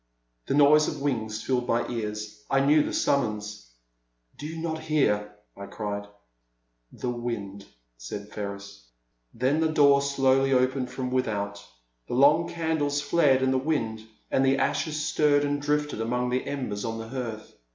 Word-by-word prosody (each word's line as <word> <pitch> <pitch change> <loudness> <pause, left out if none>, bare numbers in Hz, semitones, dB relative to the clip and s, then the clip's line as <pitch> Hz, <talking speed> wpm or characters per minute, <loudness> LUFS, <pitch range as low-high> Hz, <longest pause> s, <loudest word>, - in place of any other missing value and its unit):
The - - 0
noise 150 +1 +6
of 150 - -4
wings 110 -6 -2
filled 125 -2 0
my 115 +1 +1
ears. 105 +1 -5
I 135 - +3
knew 150 +2 +5
the - - -2
summons. 105 - -1 0.7
Do 150 - -5
you 160 +1 -7
not 160 -1 -3
hear? 105 -10 0
" - - -47
I 100 0 -8
cried. 100 0 -5 0.8
The 125 - -4
wind,'* 105 -5 -5 0.3
said 100 +13 -7
Ferris. 100 - -7 0.4
Then 130 +6 0
the 160 -1 +2
door 140 -2 +5
slowly 135 -1 +2
opened 130 0 +1
from 130 -1 -4
without, 100 -5 -2 0.4
the - - -3
long 150 +6 +5
candles 160 -4 -1
flared 145 -3 +3
in 130 - +2
the 130 - +2
wind, 115 -7 -1 0.3
and 135 - +3
the 135 0 +3
ashes 155 +2 -1
stirred 145 -2 +3
and 145 0 -1
drifted 150 -4 -1
among 125 +2 -1
the 130 +1 -1
embers 125 -8 -3
on 115 -1 -3
the 115 0 -7
hearth. 115 -4 -6
130 Hz, 160 wpm, -26 LUFS, 110-145 Hz, 0.8 s, noise